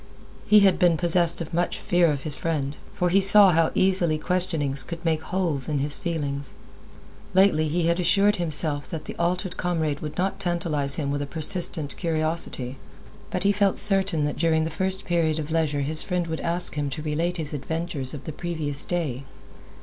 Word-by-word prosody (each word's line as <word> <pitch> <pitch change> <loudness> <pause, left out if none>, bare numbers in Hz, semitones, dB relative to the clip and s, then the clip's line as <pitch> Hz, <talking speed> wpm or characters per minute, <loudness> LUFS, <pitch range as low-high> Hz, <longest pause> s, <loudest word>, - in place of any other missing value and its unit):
He 210 0 +6
had 195 -2 +3
been 175 -2 +3
possessed 170 0 +1
of 165 - -7
much 175 +1 -1
fear 175 -1 +1
of 140 -2 -4
his 150 -2 +3
friend, 150 -4 -3 0.2
for 180 - -1
he 195 +3 +3
saw 195 0 +8
how 165 -1 +2
easily 185 -4 +1
questionings 160 -6 0
could 170 +5 -4
make 160 -1 0
holes 165 -7 -2
in 150 - -1
his 145 +1 +4
feelings. 145 -5 -4 0.8
Lately, 185 -5 +3
he 165 +2 -1
had 170 +1 +1
assured 195 +4 +3
himself 155 -3 -3
that 160 -2 -6
the - - -8
altered 180 +2 -2
comrade 160 -5 -2
would 150 -1 -7
not 190 +2 -2
tantalize 165 -7 0
him 140 -3 -3
with 145 0 -2
a 145 - -4
persistent 160 -1 +1
curiosity, 155 -6 -1 0.5
but - - -3
he 200 - +3
felt 200 -1 +1
certain 195 -6 +4
that 145 -1 -3
during 160 -1 +1
the 160 - -3
first 190 +2 0
period 165 -3 0
of 155 0 -5
leisure 155 -3 0
his 155 +3 0
friend 180 -2 -2
would 160 -1 -5
ask 175 +1 0
him 145 -1 -3
to 150 +3 -6
relate 165 +4 -2
his 155 -3 -3
adventures 150 -2 -3
of 140 - -9
the 155 - -7
previous 155 -4 -4
day. 150 -7 -3
165 Hz, 190 wpm, -24 LUFS, 150-180 Hz, 0.8 s, saw